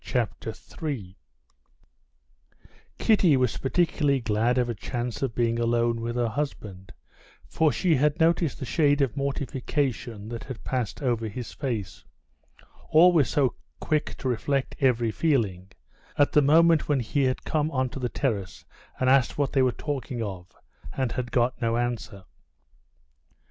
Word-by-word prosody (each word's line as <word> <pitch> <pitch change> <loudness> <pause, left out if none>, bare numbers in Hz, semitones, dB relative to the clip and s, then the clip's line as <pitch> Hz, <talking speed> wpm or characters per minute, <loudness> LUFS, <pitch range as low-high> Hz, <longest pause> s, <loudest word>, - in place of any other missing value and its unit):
Chapter 115 -3 -2
3 110 - -7 1.8
Kitty 185 -10 +4
was 125 -2 0
particularly 145 -1 +1
glad 115 +2 +1
of 125 -1 +2
a 120 - -2
chance 120 +2 -4
of 130 -4 -2
being 115 -1 +1
alone 115 0 +1
with 120 +1 -3
her 120 -1 +1
husband, 105 -7 -5 0.5
for 160 -2 +2
she 180 +2 +1
had 150 +3 +2
noticed 165 -1 +2
the - - -5
shade 145 0 +2
of 135 -5 0
mortification 135 -5 -2
that 115 -1 -6
had 130 -4 -8
passed 125 +1 -3
over 115 -3 0
his 115 +2 -6
face—always 140 - 0
so 140 -5 +2 0.3
quick 155 -1 -1
to 130 - -4
reflect 130 +3 -1
every 120 -5 +2
feeling—at 100 - -1
the 150 - +5
moment 160 +2 +4
when 145 -2 +2
he 135 +4 0
had 130 0 -1
come 155 -1 0
onto 130 -2 -2
the 125 -2 -2
terrace 100 - -3 0.3
and 130 - +1
asked 130 -2 +3
what 145 -1 0
they 135 - +3
were 130 -1 +3
talking 130 -4 -4
of, 95 -4 -7 0.4
and 130 -3 -1
had 120 0 -4
got 120 0 +1
no 115 0 +1
answer. 120 -5 -3
125 Hz, 145 wpm, -26 LUFS, 115-145 Hz, 1.8 s, the